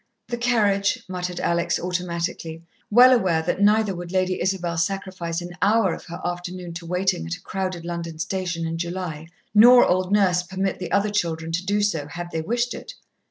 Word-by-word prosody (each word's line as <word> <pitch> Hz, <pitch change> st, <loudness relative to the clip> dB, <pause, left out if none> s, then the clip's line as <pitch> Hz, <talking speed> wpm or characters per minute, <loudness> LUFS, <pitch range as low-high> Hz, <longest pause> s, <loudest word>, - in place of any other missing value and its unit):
"The 240 Hz, -, -2 dB
carriage," 225 Hz, -2 st, +1 dB
muttered 180 Hz, -1 st, -4 dB
Alex 170 Hz, 0 st, 0 dB
automatically, 170 Hz, -2 st, -3 dB, 0.3 s
well 250 Hz, +4 st, +8 dB
aware 180 Hz, -9 st, +2 dB
that 175 Hz, +4 st, -1 dB
neither 210 Hz, 0 st, +4 dB
would 175 Hz, -1 st, -7 dB
Lady 185 Hz, -1 st, 0 dB
Isabel 175 Hz, -2 st, -1 dB
sacrifice 185 Hz, -2 st, -2 dB
an 175 Hz, 0 st, -7 dB
hour 205 Hz, -3 st, +3 dB
of -, -, -8 dB
her 170 Hz, -, -8 dB
afternoon 175 Hz, 0 st, -5 dB
to 170 Hz, 0 st, -8 dB
waiting 180 Hz, -, 0 dB
at 85 Hz, -, -3 dB
a -, -, -15 dB
crowded 185 Hz, -3 st, -4 dB
London 170 Hz, -2 st, -5 dB
station 175 Hz, 0 st, -2 dB
in 165 Hz, 0 st, -3 dB
July, 170 Hz, -3 st, -4 dB, 0.3 s
nor 245 Hz, +4 st, +8 dB
old 185 Hz, +1 st, +1 dB
Nurse 190 Hz, -4 st, +3 dB
permit 190 Hz, +1 st, -3 dB
the 180 Hz, -2 st, -5 dB
other 200 Hz, +1 st, +2 dB
children 165 Hz, -5 st, -1 dB
to 170 Hz, +3 st, -1 dB
do 205 Hz, +2 st, +1 dB
so, 160 Hz, -8 st, 0 dB
had 175 Hz, +3 st, -7 dB
they 160 Hz, -, -2 dB
wished 240 Hz, +7 st, -1 dB
it. -, -, -9 dB
180 Hz, 185 wpm, -23 LUFS, 170-200 Hz, 0.3 s, well